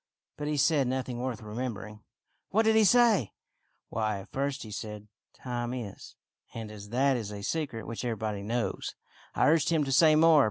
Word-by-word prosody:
" - - -59
But 150 - -3
he 150 0 0
said 140 -2 +3
nothing 130 -1 -2
worth 125 -3 -3
remembering." 105 -2 -5 0.2
" - - -47
What 220 +4 +3
did 220 0 +4
he 220 - +6
say.? 225 - +4
" - - -48
" - - -47
Why, 110 -2 -1
at - - -15
first 140 +1 -2
he 110 - -9
said, 105 0 -6 0.2
' - - -61
Time 120 -1 -3
is,' 110 -6 -8 0.4
and 110 -2 -6
as 105 -1 -10
that 135 +3 +2
is 110 -4 -3
a 100 -1 -7
secret 135 -3 -3
which 115 +1 -5
everybody 110 -3 -2
knows, 115 +2 -2 0.4
I - - +3
urged 155 -1 +4
him 160 -3 +2
to 135 - -3
say 155 +3 +6
more. 160 0 +6
125 Hz, 210 wpm, -29 LUFS, 110-150 Hz, 0.4 s, he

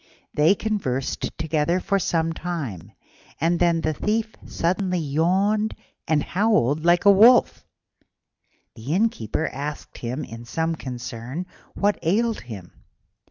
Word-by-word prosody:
They 155 +7 +4
conversed 185 - -2
together 160 +2 0
for 195 +2 0
some 165 -2 0
time, 135 - -5 0.5
and 170 +3 +1
then 170 -2 +3
the 155 0 0
Thief 220 +7 -1
suddenly 180 +2 0
yawned 185 +8 +1 0.3
and 150 -2 +2
howled 165 - +1
like 175 +2 +3
a 200 - +9
wolf. 230 +5 +5 1.1
The 130 +9 -3
Innkeeper 160 - 0
asked 145 +2 -6
him 125 +5 -4
in 115 +1 -9
some 165 +6 -1
concern 125 +2 -6 0.3
what 205 +1 +1
ailed 215 +7 +1
him. 100 -7 -9
165 Hz, 120 wpm, -23 LUFS, 140-195 Hz, 1.1 s, a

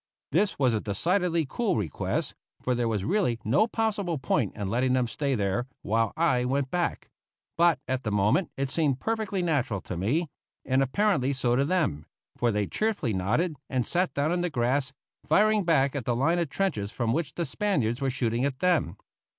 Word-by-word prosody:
This 200 +6 +1
was 130 -4 +3
a 110 - 0
decidedly 170 - 0
cool 200 - 0
request, 90 -9 -2 0.3
for 125 - -1
there 120 -1 0
was 105 -4 -1
really 175 - +1
no 145 - +3
possible 210 -7 -1
point 125 -5 0
in 100 - -3
letting 125 +5 +1
them 130 -1 +2
stay 140 +3 -1
there 105 +4 -1 0.2
while 115 +1 +1
I 155 -7 +2
went 135 +1 -1
back; 175 -1 -2 0.4
but 170 -3 +4
at 130 0 -1
the 110 - -2
moment 105 - +2
it 135 0 -2
seemed 145 -5 +1
perfectly 215 -3 -1
natural 135 - 0
to - - -6
me, 125 - 0 0.4
and 130 0 +2
apparently 140 -1 +1
so 125 -2 +1
to 135 +2 +2
them, 150 - 0 0.3
for 120 -1 +1
they 105 -1 0
cheerfully 205 - -1
nodded, 105 - 0
and 130 -3 0
sat 180 +1 0
down 145 +3 +1
in 175 0 0
the 180 - 0
grass, 130 0 0 0.4
firing 215 0 +4
back 140 -4 +2
at 135 -5 -3
the 120 - +1
line 165 +8 +2
of 170 -4 -1
trenches 110 - -1
from 115 -2 -1
which 155 0 -2
the 170 - -1
Spaniards 135 - -1
were 135 - +1
shooting 120 -2 -1
at 135 -2 -1
them. 175 - +1
135 Hz, 190 wpm, -27 LUFS, 120-175 Hz, 0.4 s, but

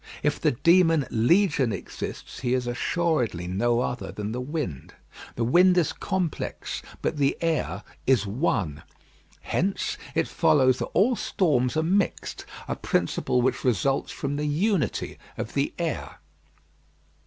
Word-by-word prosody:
If - - +1
the - - +4
demon 165 +1 +4
Legion 130 - +3
exists, - - -6
he 125 -1 +1
is 125 -1 -1
assuredly 120 - 0
no 115 +7 +1
other 125 0 -3
than 105 0 -4
the 125 +2 -3
wind. 130 - -4 0.4
The 115 - -1
wind 180 +9 +5
is 170 - +2
complex, 185 -5 -3 0.2
but - - -1
the 140 -1 +2
air 150 - -1 0.2
is 125 -6 +4
one. 100 - -1 0.6
Hence 190 +3 -1 0.2
it - - +2
follows 130 -3 +3
that - - -1
all 235 +7 +3
storms 145 - +1
are 160 - +2
mixed 195 +4 -1 0.2
a - - -2
principle 125 - 0
which 130 - 0
results 135 +3 +1
from 140 +1 -3
the 150 - -1
unity 160 - 0 0.2
of - - -5
the - - 0
air. - - -3
135 Hz, 140 wpm, -26 LUFS, 120-170 Hz, 0.6 s, wind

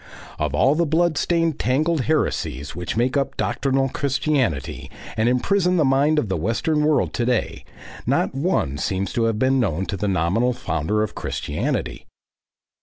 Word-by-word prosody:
Of - - -1
all 135 - +4
the 170 +1 +1
blood 165 +2 +2
stained 165 -1 0
tangled 150 +5 +1
heresies 75 - -1
which 90 +5 -4
make 125 +3 +1
up 140 -1 -1
doctrinal 135 -1 0
Christianity 135 - -1 0.3
and 110 +1 +2
imprison 180 +8 +2
the 155 - +3
mind 140 +4 +3
of 135 - +1
the 95 - -1
western 115 - 0
world 150 -1 +2
to 120 - -1
day, 120 -1 -1 0.4
not - - +1
one 135 - 0
seems 95 +4 -2
to 115 - +1
have 115 -2 0
been 130 +3 +2
known 95 -5 0
to 100 - -4
the 105 - -2
nominal 100 +7 +1
founder 105 +1 -1
of 110 - -4
Christianity. - - -3
130 Hz, 165 wpm, -22 LUFS, 105-150 Hz, 0.4 s, all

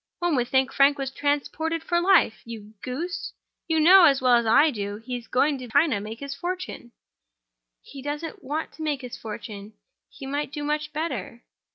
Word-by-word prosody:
One 345 -3 0
would 245 -2 0
think 265 +1 +1
Frank 280 +1 +4
was 270 -1 -3
transported 295 +4 -1
for 345 0 +1
life. 365 - +3
You 220 -2 -10
goose! 325 +8 -4 0.3
You 320 -1 +1
know, 360 +3 +8
as 275 -4 +4
well 255 -1 +3
as 235 -1 +3
I 295 +8 +5
do, 205 -4 -4
he 245 +3 -6
is 240 -2 -7
going 280 +2 +1
to 250 - -8
China 285 0 +3
to - - -5
make 220 +4 -8
his 280 0 -5
fortune." 350 -5 -5 0.9
"He 275 - -11
doesn't 300 +6 -5
want 300 +4 -3
to - - -13
make 295 -3 -1
his 250 -2 -7
fortune—he 215 - -10
might 285 +1 -3
do 295 -1 -5
much 300 0 -2
better." 260 - -4
280 Hz, 190 wpm, -25 LUFS, 240-315 Hz, 0.9 s, know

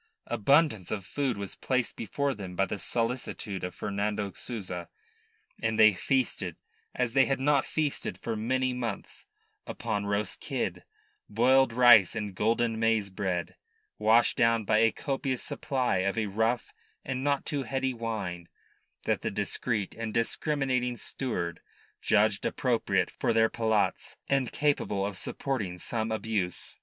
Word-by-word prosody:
Abundance 135 - +2
of 100 -3 -3
food 135 -3 -1
was 100 -1 -5
placed 130 -3 -1
before 140 +6 -1
them 95 -5 -7
by 95 - +2
the 100 - -4
solicitude 115 -3 -2
of 90 -1 -4
Fernando 100 0 -2
Souza, 95 -7 -6 0.7
and 110 0 0
they 110 -1 +7
feasted, 130 +7 -1 0.4
as 125 -2 0
they 135 -1 +5
had 135 - 0
not 140 0 +2
feasted 155 -3 -2
for 115 - -3
many 130 +4 0
months, 120 -5 -5 0.4
upon 100 0 -3
roast 100 0 -1
kid, - - -3 0.5
boiled 125 +4 +4
rice 120 -4 +7
and 105 -3 -3
golden 115 +3 +1
maize 110 -3 +2
bread, 95 -3 -2 0.4
washed 110 +2 +4
down 115 -2 +3
by 110 +1 +3
a 115 0 +5
copious 135 -3 -2
supply 130 -7 -1
of 100 +3 0
a 110 - +1
rough 110 +4 0 0.3
and 130 0 -3
not 140 -1 +1
too 145 -2 -1
heady 135 -1 -1
wine 105 -7 -4 0.5
that - - 0
the - - -1
discreet 105 -4 -2
and 115 -1 -5
discriminating 125 0 0
steward 90 -7 -3 0.4
judged - - +3
appropriate - - +1
to - - +2
their 115 0 +4
palates 110 -2 0
and 135 -3 +1
capable 140 -9 0
of 100 -1 -4
supporting 105 -4 -3
some 110 +4 -2
abuse. 110 -5 -2
115 Hz, 145 wpm, -29 LUFS, 100-130 Hz, 0.7 s, they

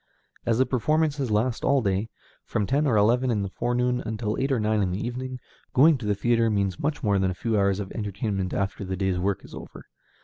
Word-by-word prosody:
As 115 -1 +2
the 130 - +4
performances 145 +2 0
last 115 +3 0
all 140 -3 +3
day, 100 +2 0 0.3
from 105 - -1
ten 145 +7 +1
or 115 -5 +3
eleven 120 +5 +3
in 105 -4 0
the 95 - -5
forenoon 125 +2 0
until 110 -1 -2
eight 135 +1 0
or 130 - +2
nine 110 0 +1
in 95 - +1
the 90 - -2
evening, 130 +1 -4 0.4
going 155 +5 +6
to 110 - -5
the 105 - +2
theatre 115 +2 +2
means 100 -4 0
much 150 +1 -2
more 100 -3 +2
than 95 0 +1
a 90 - -3
few 110 +4 -1
hours 100 -1 +2
of 100 -2 -5
entertainment 100 -3 -3
after 100 0 -2
the 95 0 -4
day's 95 -1 0
work 95 +1 -1
is - - -14
over. - - -10
110 Hz, 230 wpm, -25 LUFS, 100-125 Hz, 0.4 s, going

